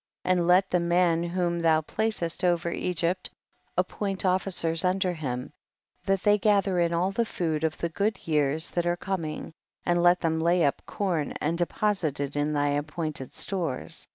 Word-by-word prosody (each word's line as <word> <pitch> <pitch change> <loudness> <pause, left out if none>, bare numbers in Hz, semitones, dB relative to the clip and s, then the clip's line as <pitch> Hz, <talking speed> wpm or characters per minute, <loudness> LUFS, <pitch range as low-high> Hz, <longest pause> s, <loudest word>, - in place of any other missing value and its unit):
58. 185 - +1
And 175 -2 +2
let 185 +2 +5
the 180 - +3
man 170 -1 +2
whom 175 0 -1
thou 160 -1 +3
placcst 180 -1 -2
over 175 -1 +1
Egypt 180 +1 -1 0.5
appoint 195 -2 -1
officers 180 -3 +1
under 185 0 +1
him, 135 -4 -4 0.5
that 195 -1 +1
they 210 0 +4
gather 200 -3 +2
in 170 -1 +2
all 175 +3 +1
the 235 +4 +1
food 160 -8 -2
of 160 -1 0
the 170 - -2
good 200 +4 -2
years 150 0 +1
that 175 0 -1
are 175 0 +1
com 190 -3 -3
ing, 155 +1 -6 0.3
and 175 0 +2
let 175 +1 +5
them 160 -1 0
lay 170 +1 +3
up 140 - 0
com 175 -7 -1
and 160 +3 0
deposit 175 -3 0
it 140 0 -3
in 145 +1 0
thy 145 -1 +1
appointed 145 -1 -3
stores. 170 -9 -3
170 Hz, 180 wpm, -27 LUFS, 160-185 Hz, 0.5 s, let